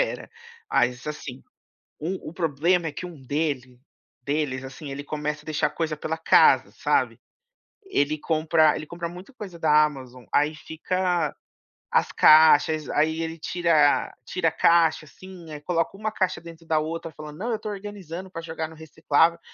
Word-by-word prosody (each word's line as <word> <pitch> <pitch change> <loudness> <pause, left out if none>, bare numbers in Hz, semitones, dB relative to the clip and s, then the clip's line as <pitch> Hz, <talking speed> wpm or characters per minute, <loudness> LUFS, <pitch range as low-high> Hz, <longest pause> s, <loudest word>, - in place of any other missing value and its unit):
era. - - -2 0.4
Mas 120 +2 +1
assim, 140 -4 -6 0.6
o 175 +4 -4
o 160 - -13
problema 165 +1 +1
é - - -3
que 180 - -7
um 165 -6 -10
dele 130 -3 -3 0.4
deles, 140 -3 -2
assim, 135 +2 -8
ele 140 +1 -6
começa 150 0 -4
a - - -24
deixar 150 -1 0
coisa 155 0 -2
pela 160 +2 -3
casa, 160 - +5
sabe. - - 0 0.7
Ele 155 - 0
compra 155 0 +3
ele - - -5
compra 170 +2 -5
muito 180 +9 -12
coisa 195 -8 -9
da 150 -1 +5
Amazon, 130 -4 -8
aí 150 +2 +3
fica 175 +3 -1 0.6
as - - +2
caixas, 155 0 +6
aí 160 +2 +1
ele 165 0 -4
tira 160 -3 +2
tira - - 0
a - - -12
caixa, 165 -2 +3
assim, 180 +1 -13
aí 150 -1 -7
coloca 170 +2 -1
uma 215 +2 -3
caixa 185 -6 -1
dentro 165 0 -12
da 160 -1 +1
outra 165 +1 -4
falando: 150 0 -10
"Não, 235 +5 -4
eu 225 - +1
estou 215 0 -6
organizando 190 -3 -7
para 165 - -6
jogar 160 -1 -4
no 160 - -13
reciclável", 160 +1 +1
160 Hz, 170 wpm, -25 LUFS, 150-170 Hz, 0.7 s, caixas